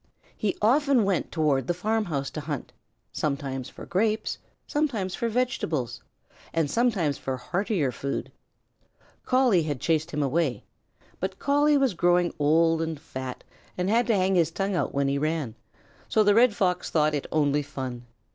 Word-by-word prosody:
He 210 - -1
often 270 +1 +4
went 195 -3 0
toward 145 -5 +1
the 175 - 0
farmhouse 180 -8 -1
to 155 - -5
hunt, 145 -4 -5 0.4
sometimes 135 -3 -3
for - - -10
grapes, 215 +3 0 0.3
sometimes 235 -12 -1
for 235 - -1
vegetables, 160 - -1 0.5
and 160 -3 0
sometimes 195 - +1
for 130 -1 -3
heartier 175 - -1
food. 140 +3 -4 1.0
Collie 255 -8 +4
had 150 -4 -3
chased 160 +2 0
him 150 -2 -1
away, 140 -1 0 0.6
but 190 +1 -3
Collie 290 +1 +3
was 270 -6 +2
growing 175 0 +2
old 165 +2 +3
and 160 -2 -3
fat 130 -4 -7 0.3
and 180 +2 0
had 235 +2 +3
to 230 - +3
hang 190 0 +2
his 170 -4 +3
tongue 195 +3 -2
out - - 0
when 140 0 0
he 140 +1 0
ran, 155 -6 -1 0.6
so 215 - +4
the 205 0 +5
Red 230 0 +5
Fox 180 -2 0
thought 155 -1 +2
it 145 - -2
only 145 -1 +2
fun. 130 -4 -6
165 Hz, 160 wpm, -26 LUFS, 145-210 Hz, 1.0 s, the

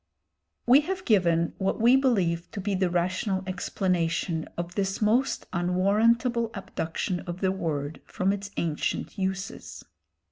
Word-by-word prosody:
We 255 +4 +7
have 370 +3 -4
given 170 -6 +3
what 195 - 0
we 235 +3 +6
believe 190 -11 +1
to - - -4
be 200 +1 -1
the 185 -1 +1
rational 185 +2 0
explanation 180 -3 -1
of 175 0 -4
this 195 0 -1
most 230 +5 +1
unwarrantable 220 +7 +2
abduction 180 -1 -3
of 175 +1 -5
the 190 -1 +2
word 155 -6 -3
from 190 +2 0
its 200 0 -5
ancient 165 +5 -2
uses. 190 0 -4
190 Hz, 135 wpm, -27 LUFS, 175-215 Hz, -, We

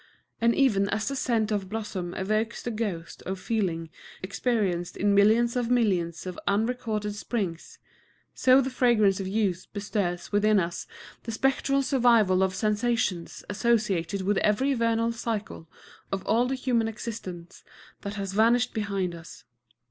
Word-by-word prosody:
And 235 0 +3
even 205 -8 +3
as 215 +1 -1
the 275 - -1
scent 225 -4 0
of 205 -1 +1
a - - -11
blossom 190 -4 -4
evokes 215 +4 -1
the 240 - -3
ghosts 200 -7 -4
of 190 0 -5
feelings 180 -7 -2 0.3
experienced 195 -4 -1
in 205 0 +2
millions 220 +4 +4
of 245 -2 0
millions 185 -10 +1
of 185 -1 -6
unrecorded 215 -1 0
springs, 200 -5 -4 0.6
so 260 +1 +5
the 265 0 -3
fragrance 220 -6 +3
of 195 - -3
youth 195 -3 -1
bestirs 200 -4 -2
within 210 0 +4
us 170 -1 -3 0.3
the 230 - -6
spectral 270 +3 +1
survival 235 -8 +4
of 190 -1 +1
sensations 215 -5 -1
associated 200 -4 0
with 200 +1 +1
every 260 +7 +2
vernal 230 -1 +1
cycle 220 -8 -4 0.4
of 195 -1 -3
all 235 +3 +2
the 265 - -1
human 245 -3 0
existence 200 -6 -7 0.4
that 200 +1 -5
has 195 -2 -4
vanished 235 +3 +3
behind 200 -4 -2
us. 170 0 -11
210 Hz, 150 wpm, -27 LUFS, 190-235 Hz, 0.6 s, so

